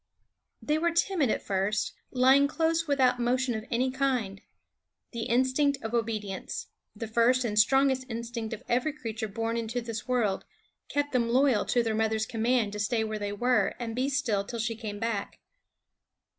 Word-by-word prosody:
They 300 Hz, +1 st, +1 dB
were 340 Hz, +1 st, +2 dB
timid 335 Hz, -, +1 dB
at -, -, -1 dB
first, 195 Hz, +2 st, -1 dB, 0.2 s
lying 265 Hz, +2 st, +5 dB
close 325 Hz, +2 st, 0 dB
without 260 Hz, -3 st, +3 dB
motion 250 Hz, +1 st, +1 dB
of 220 Hz, 0 st, -4 dB
any 255 Hz, +2 st, +1 dB
kind. 255 Hz, -8 st, -1 dB, 0.7 s
The 235 Hz, -2 st, -4 dB
instinct 260 Hz, +4 st, +2 dB
of 220 Hz, +1 st, -4 dB
obedience 215 Hz, -4 st, -3 dB, 0.3 s
the 230 Hz, -, -5 dB
first 235 Hz, +3 st, +3 dB
and 210 Hz, -2 st, +1 dB
strongest 265 Hz, +2 st, +3 dB
instinct 230 Hz, -1 st, -4 dB
of 225 Hz, -, -6 dB
every 250 Hz, +5 st, +1 dB
creature 225 Hz, -6 st, -4 dB
born 225 Hz, +2 st, -2 dB
into 230 Hz, +1 st, -2 dB
this 230 Hz, -1 st, -6 dB
world 235 Hz, -6 st, +1 dB, 0.5 s
kept 290 Hz, 0 st, -1 dB
them 235 Hz, -3 st, +1 dB
loyal 255 Hz, -2 st, +3 dB
to 240 Hz, -, +2 dB
the 225 Hz, -1 st, -1 dB
mother's 220 Hz, 0 st, +1 dB
command 230 Hz, -2 st, 0 dB
to 210 Hz, -, -5 dB
stay 220 Hz, +2 st, +1 dB
where 215 Hz, -1 st, -3 dB
they 205 Hz, 0 st, -3 dB
were 245 Hz, +5 st, +1 dB
and 230 Hz, -2 st, -4 dB
be 260 Hz, +3 st, 0 dB
still 255 Hz, -8 st, 0 dB
till 235 Hz, +4 st, -6 dB
she 225 Hz, 0 st, -1 dB
came 215 Hz, -2 st, -6 dB
back. 220 Hz, -2 st, -3 dB
235 Hz, 170 wpm, -28 LUFS, 220-260 Hz, 0.7 s, lying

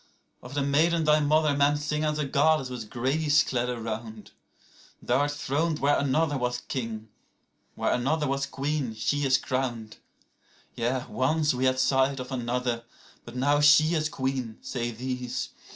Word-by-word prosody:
75Of 125 Hz, +2 st, -10 dB
the 145 Hz, -, +1 dB
maiden 160 Hz, +4 st, +2 dB
thy 150 Hz, 0 st, +4 dB
mother 150 Hz, 0 st, +2 dB
men 145 Hz, +1 st, +3 dB
sing 150 Hz, +1 st, -2 dB
as 150 Hz, 0 st, 0 dB
a 150 Hz, -, -1 dB
goddess 140 Hz, -1 st, +2 dB
with 115 Hz, -4 st, -6 dB
grace 145 Hz, +5 st, +2 dB
clad 125 Hz, -1 st, -1 dB
around;76Thou 115 Hz, +1 st, -7 dB
art 145 Hz, +2 st, +2 dB
throned 150 Hz, +2 st, -1 dB
where 145 Hz, 0 st, +2 dB
another 145 Hz, +1 st, +1 dB
was 125 Hz, 0 st, -2 dB
king; 110 Hz, -4 st, -4 dB, 0.7 s
where -, -, 0 dB
another 150 Hz, +5 st, 0 dB
was 135 Hz, +1 st, -1 dB
queen 140 Hz, -4 st, -2 dB
she 145 Hz, +6 st, 0 dB
is 130 Hz, 0 st, +4 dB
crowned.77Yea, 125 Hz, 0 st, -5 dB
once 150 Hz, +3 st, +1 dB
we 130 Hz, +1 st, -1 dB
had 130 Hz, 0 st, +2 dB
sight 135 Hz, +1 st, +2 dB
of 125 Hz, +1 st, -7 dB
another: 125 Hz, -1 st, -2 dB, 0.4 s
but 120 Hz, -, -10 dB
now 145 Hz, +3 st, +2 dB
she 150 Hz, +2 st, +6 dB
is 155 Hz, -2 st, 0 dB
queen, 130 Hz, -5 st, -3 dB
say 120 Hz, -2 st, -3 dB
these. 125 Hz, +1 st, -4 dB
135 Hz, 150 wpm, -27 LUFS, 125-150 Hz, 0.7 s, she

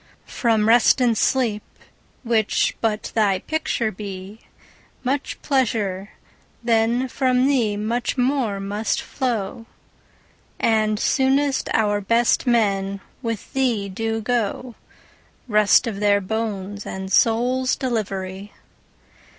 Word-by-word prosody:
From 220 Hz, -3 st, +1 dB
Rest 235 Hz, +3 st, +5 dB
and 240 Hz, -3 st, +3 dB
Sleep, 225 Hz, -4 st, +1 dB, 0.6 s
which 225 Hz, -3 st, +1 dB
but 220 Hz, -2 st, -1 dB
thy 205 Hz, -4 st, +2 dB
picture 235 Hz, -2 st, -2 dB
be, 195 Hz, +1 st, -8 dB
5 -, -, -30 dB, 0.6 s
Much 270 Hz, +2 st, -2 dB
pleasure, 210 Hz, -8 st, 0 dB, 0.5 s
then 235 Hz, +2 st, +2 dB
from 255 Hz, 0 st, +1 dB
thee 240 Hz, -7 st, +1 dB
much 235 Hz, +5 st, -2 dB
more 250 Hz, -5 st, 0 dB
must 205 Hz, +3 st, -2 dB
flow; 230 Hz, -3 st, -3 dB, 0.9 s
And 215 Hz, -2 st, +2 dB
soonest 270 Hz, +1 st, +1 dB
our 205 Hz, -2 st, +1 dB
best 230 Hz, +5 st, +2 dB
men 200 Hz, -4 st, +1 dB, 0.2 s
with 230 Hz, -4 st, -5 dB
thee 240 Hz, -7 st, 0 dB
do 225 Hz, +3 st, -2 dB
go— 240 Hz, +1 st, -2 dB, 0.7 s
Rest 210 Hz, +1 st, +4 dB
of 215 Hz, -4 st, -4 dB
their 205 Hz, -1 st, +3 dB
bones 205 Hz, -1 st, -4 dB
and 190 Hz, 0 st, -6 dB
souls' 250 Hz, +3 st, +2 dB
delivery! 200 Hz, -6 st, -4 dB
225 Hz, 110 wpm, -22 LUFS, 205-245 Hz, 0.9 s, Rest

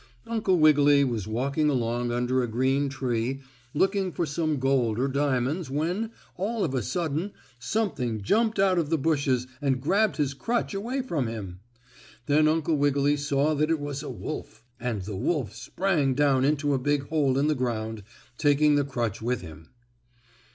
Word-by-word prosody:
Uncle 215 Hz, -5 st, +1 dB
Wiggily 145 Hz, -2 st, +5 dB
was 115 Hz, -6 st, -2 dB
walking 140 Hz, +7 st, 0 dB
along 120 Hz, -2 st, 0 dB
under 125 Hz, +2 st, +1 dB
a 120 Hz, -, -1 dB
green 130 Hz, +5 st, +1 dB
tree, 130 Hz, -1 st, -2 dB, 0.4 s
looking 190 Hz, +2 st, +1 dB
for 170 Hz, -, -1 dB
some 155 Hz, 0 st, -1 dB
gold 130 Hz, -4 st, +1 dB
or 130 Hz, +3 st, +1 dB
diamonds 140 Hz, +3 st, 0 dB
when, 175 Hz, +10 st, -1 dB, 0.3 s
all 215 Hz, +3 st, -1 dB
of 140 Hz, -, -1 dB
a 130 Hz, -, 0 dB
sudden 165 Hz, -, -2 dB, 0.3 s
something 125 Hz, -, -1 dB
jumped 220 Hz, -, +2 dB
out 190 Hz, -2 st, +3 dB
of 155 Hz, -3 st, -1 dB
the 165 Hz, -, +2 dB
bushes 140 Hz, -4 st, +1 dB, 0.2 s
and 135 Hz, -3 st, +1 dB
grabbed 195 Hz, +10 st, +1 dB
his 145 Hz, -3 st, 0 dB
crutch 235 Hz, +10 st, -2 dB
away 240 Hz, +7 st, -2 dB
from 155 Hz, -, -1 dB
him. 100 Hz, -6 st, -6 dB, 0.7 s
Then 150 Hz, +3 st, +4 dB
Uncle 160 Hz, 0 st, +1 dB
Wiggily 145 Hz, 0 st, +2 dB
saw 145 Hz, +1 st, +1 dB
that 155 Hz, +1 st, +1 dB
it 165 Hz, -1 st, +1 dB
was 145 Hz, -1 st, -4 dB
a 150 Hz, -, -6 dB
wolf, -, -, -7 dB, 0.2 s
and 115 Hz, -7 st, -3 dB
the 100 Hz, +1 st, -5 dB
wolf 125 Hz, -, -1 dB
sprang 140 Hz, +3 st, 0 dB
down 135 Hz, -2 st, +3 dB
into 145 Hz, 0 st, +1 dB
a 135 Hz, -, +1 dB
big 140 Hz, +1 st, 0 dB
hole 145 Hz, -4 st, +2 dB
in 140 Hz, -, +2 dB
the 155 Hz, -, +3 dB
ground, 110 Hz, -4 st, -3 dB, 0.4 s
taking 145 Hz, 0 st, +4 dB
the 145 Hz, 0 st, +3 dB
crutch 120 Hz, -7 st, -3 dB
with 125 Hz, +2 st, -1 dB
him. 80 Hz, 0 st, -11 dB
140 Hz, 170 wpm, -26 LUFS, 125-160 Hz, 0.7 s, Wiggily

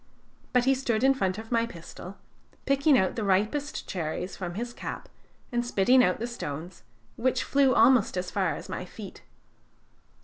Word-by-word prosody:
But 250 Hz, -1 st, +3 dB
he 270 Hz, -, +5 dB
stood 250 Hz, -4 st, -1 dB
in 270 Hz, 0 st, +6 dB
front 190 Hz, -7 st, -1 dB
of 225 Hz, +1 st, -9 dB
my 230 Hz, -1 st, +2 dB
pistol, 180 Hz, 0 st, -10 dB, 0.5 s
picking 275 Hz, +1 st, +4 dB
out 190 Hz, -4 st, +1 dB
the 225 Hz, -, -2 dB
ripest 215 Hz, +10 st, 0 dB
cherries 175 Hz, +1 st, -4 dB
from 175 Hz, -2 st, -5 dB
his 240 Hz, +3 st, -4 dB
cap -, -, -6 dB, 0.4 s
and 240 Hz, -1 st, 0 dB
spitting 245 Hz, +2 st, +4 dB
out 180 Hz, -, +2 dB
the 230 Hz, -, -3 dB
stones, 170 Hz, -7 st, -6 dB, 0.4 s
which 255 Hz, +2 st, +1 dB
flew 275 Hz, -2 st, +3 dB
almost 250 Hz, -8 st, +4 dB
as 180 Hz, 0 st, -3 dB
far -, -, 0 dB
as -, -, -8 dB
my -, -, -5 dB
feet. -, -, -10 dB
230 Hz, 170 wpm, -27 LUFS, 185-255 Hz, 0.5 s, in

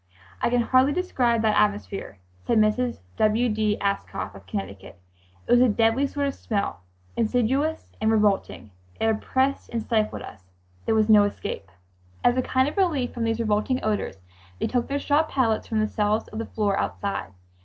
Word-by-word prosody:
"I -, -, +2 dB
can 245 Hz, 0 st, +2 dB
hardly 260 Hz, +4 st, +3 dB
describe 245 Hz, -11 st, +1 dB
that 215 Hz, -1 st, +3 dB
atmosphere," 205 Hz, -, -1 dB, 0.3 s
said 230 Hz, -, +3 dB
Mrs. 215 Hz, -, +1 dB, 0.2 s
W. 220 Hz, +3 st, +3 dB
D. 215 Hz, -1 st, 0 dB
Ascough, 200 Hz, -, -2 dB
of 100 Hz, -2 st, -14 dB
Connecticut. 95 Hz, -1 st, -6 dB, 0.5 s
"It -, -, -4 dB
was 245 Hz, 0 st, +6 dB
a 255 Hz, -, +5 dB
deadly 225 Hz, +5 st, +2 dB
sort 285 Hz, +1 st, -2 dB
of 275 Hz, -, -1 dB
smell, 200 Hz, -, -3 dB, 0.4 s
insidious 255 Hz, +7 st, 0 dB
and 220 Hz, -, +2 dB
revolting. 205 Hz, -, +1 dB, 0.3 s
It -, -, +1 dB
oppressed 260 Hz, +5 st, 0 dB
and 235 Hz, -, -2 dB
stifled 215 Hz, -2 st, 0 dB
us. 95 Hz, -3 st, -12 dB, 0.4 s
There 225 Hz, -, +3 dB
was 215 Hz, -1 st, +3 dB
no 210 Hz, -2 st, +7 dB
escape." 200 Hz, -, -5 dB, 0.5 s
As 245 Hz, -, +4 dB
a 255 Hz, -, +2 dB
kind 260 Hz, +1 st, +1 dB
of 295 Hz, -, -5 dB
relief 310 Hz, -10 st, +1 dB
from 235 Hz, -1 st, -2 dB
these 225 Hz, 0 st, 0 dB
revolting 220 Hz, +3 st, +1 dB
odors, 210 Hz, -, -1 dB, 0.4 s
they -, -, 0 dB
took 245 Hz, -2 st, 0 dB
their 280 Hz, -, -1 dB
straw 290 Hz, +1 st, +2 dB
pallets 260 Hz, -8 st, 0 dB
from 220 Hz, -1 st, 0 dB
the 215 Hz, -, +1 dB
cells 210 Hz, +1 st, 0 dB
to -, -, -14 dB
the 225 Hz, +1 st, -4 dB
floor 205 Hz, -3 st, 0 dB
outside. 100 Hz, +1 st, -3 dB
220 Hz, 180 wpm, -25 LUFS, 210-255 Hz, 0.5 s, no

